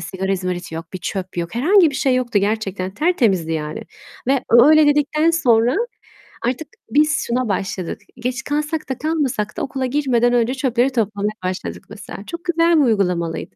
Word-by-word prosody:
sigara 190 +3 -3
izmariti 180 -3 -3
yok, 165 +2 -7
bir 185 - -5
çöp 185 -1 -5
yok." 170 +2 -3
Herhangi 330 - +4
bir - - -9
şey 265 -1 +1
yoktu 245 -4 +1
gerçekten, 200 -2 -2
tertemizdi 210 - +1
yani 155 -1 -4 0.4
ve 270 -1 +2
o 235 +3 +8
öyle 310 -1 +6
dedikten 295 +2 +2
sonra 245 -4 +3 0.7
artık 255 +6 -2 0.2
biz 300 +1 +2
şuna 245 -1 -1
başladık. 190 -2 -3 0.2
Geç 250 +1 -3
kalsak 300 +1 -2
da 265 - -2
kalmasak 285 -9 -2
da - - -2
okula 265 -1 -2
girmeden 250 -3 +1
önce 240 +1 +2
çöpleri 255 -1 +1
toplamaya 210 -3 -1
başladık 185 0 -4
mesela. 205 -2 -9
Çok 340 0 -7
güzel 335 -1 +3
bir - - +5
uygulamalıydı. 180 -8 -1
240 Hz, 170 wpm, -20 LUFS, 195-290 Hz, 0.7 s, o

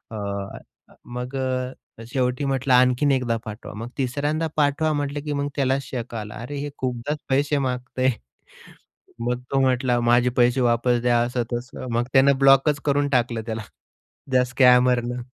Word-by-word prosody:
अ, 100 -1 -7 0.2
मग 125 +2 -5
अ, 130 -3 -4
शेवटी 125 +1 0
म्हटलं, 135 -1 0
"आणखीन 125 +3 +4
एकदा 125 -4 +1
पाठवा." 110 0 -8
मग 115 +3 -6
तिसऱ्यांदा 145 +5 -1
पाठवा 150 +2 +2
म्हटलं, 145 0 -2
की 150 - -2
मग 140 0 -1
त्याला 135 -1 +1
शक 120 -3 -6
आला, 105 -1 -6
"अरे, 140 +5 -6
हे 145 +1 -4
खूपदाच 130 +4 -3
पैसे 145 +2 +2
मागतंय." 130 -1 -1 1.2
मग 125 0 -1
तो 135 - +2
म्हटला, 125 -2 +2
"माझे 120 +1 +3
पैसे 125 +1 +3
वापस 120 0 +2
द्या." 120 -1 +3
असं-तसं. 120 +1 -4
मग 120 - +2
त्यानं 135 0 +5
ब्लॉकच 135 +2 +5
करून 145 0 +2
टाकलं 120 -3 0
त्याला 110 -1 -3 0.7
त्या 125 -1 +4
स्कॅमरनं. 125 -1 +3
125 Hz, 150 wpm, -23 LUFS, 120-140 Hz, 1.2 s, त्यानं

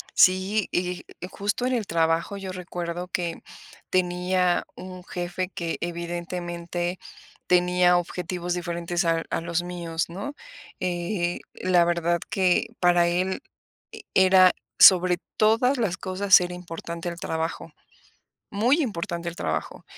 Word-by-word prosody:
Sí, 190 +3 +4
eh, 180 0 -1 0.2
y - - -3
justo, 205 +5 -2
en 255 - 0
el 220 -5 -1
trabajo, 165 +3 +1
yo 190 -1 -6
recuerdo 175 -1 -5
que 175 -4 -3 0.5
tenía 180 0 +1
un 185 -1 -9
jefe 180 0 -4
que, 170 -1 -3
evidentemente, 175 0 -4 0.5
tenía 180 0 +4
objetivos 175 0 -3
diferentes 175 0 -2
a 165 0 +1
a - - -1
los 170 +1 -1
míos 170 -2 -3
¿no?, 200 +12 -6 0.5
eh, 175 0 -2
la 180 -2 +3
verdad 170 0 +1
que, 190 -7 +2
para 175 -1 +4
él 185 +7 -1 0.5
e - - -10
era, 185 -1 +6 0.3
sobre 180 -1 +7 0.2
todas 230 +5 +3
las 195 -6 0
cosas, 190 +1 +4
era 180 0 -3
importante 170 -1 -6
el 170 0 -6
trabajo. 160 0 -3 0.8
Muy 245 +10 +2
importante 170 -6 -3
el 170 - -7
trabajo. - - -3
180 Hz, 130 wpm, -25 LUFS, 170-185 Hz, 0.8 s, sobre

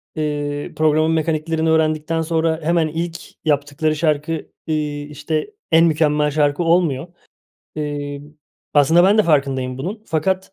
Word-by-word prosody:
eee, 145 -1 -3
programın 155 +1 +2
mekaniklerini 160 0 0
öğrendikten 160 0 +1
sonra 160 0 0
hemen 165 0 +2
ilk 165 +2 -3 0.3
yaptıkları 150 +1 0
şarkı, 155 0 0 0.4
ııı, 155 - +1 0.3
işte, 150 - -3 0.2
en 165 +1 +6
mükemmel 150 -2 +2
şarkı 145 +2 +1
olmuyor. 165 -4 +2 0.7
Iıı, 145 -1 -4 0.5
aslında 160 +5 +5
ben 205 +3 +4
de - - +7
farkındayım 135 -6 0
bunun 200 +10 -5
fakat, 190 +4 -1
155 Hz, 125 wpm, -20 LUFS, 145-165 Hz, 0.7 s, de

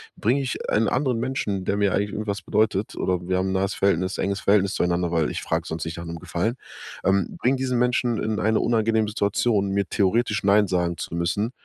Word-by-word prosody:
bring 120 +6 +1
ich 135 -3 -3
einen 110 +1 +2
anderen 130 -4 0
Menschen, 115 -6 -2
der 100 - 0
mir 100 -2 +2
eigentlich 100 +1 0
irgendwas 105 -2 -3
bedeutet 105 0 0
oder 90 -1 0
wir 95 0 +1
haben 95 +1 0
'n - - -1
nahes 95 +1 0
Verhältnis 95 -1 +1
enges 100 +1 -1
Verhältnis 100 -1 +3
zueinander, 85 0 0
weil 80 -3 +1
ich - - -4
frag's - - -2
sonst 80 -1 -4
nicht 80 0 -5
nach 85 - -6
'nem 85 0 -6
Gefallen. 105 +9 -2 0.5
Ähm, 95 -1 +1
bring 130 +3 +2
diesen 130 -1 -1
Menschen 125 -1 +1
in 110 -1 -1
eine 110 +1 +2
unangenehme 110 -1 +1
Situation, 105 0 +1
mir 100 0 0
theoretisch 110 +4 +1
nein 105 +1 +5
sagen 90 -2 0
zu - - -6
müssen, 90 +7 -1
100 Hz, 210 wpm, -24 LUFS, 95-110 Hz, 0.5 s, nein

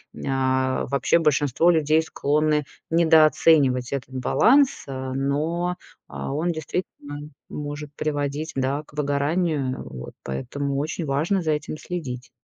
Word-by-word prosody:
М, - - -8
а, 130 -1 +1
вообще 140 +5 +2
большинство 150 0 +3
людей 160 -2 +4
склонны 150 -1 +1 0.3
недооценивать 155 -5 +4
этот 135 -1 -4
баланс, 265 - +3
а, 130 -1 -4
но, 155 +6 -1 0.3
а, - - -5
он 165 +5 0
действительно 160 0 -5 0.7
может 145 0 -5
приводить, 145 +1 -2
да, 135 +3 -1
к 150 - -22
выгоранию. 145 -1 0
Вот, 65 -1 -8
поэтому 135 - -3
очень 155 +3 -2
важно 155 +8 +1
за 160 -2 0
этим 150 0 -2
следить. 130 -9 -6
145 Hz, 125 wpm, -24 LUFS, 135-160 Hz, 0.7 s, людей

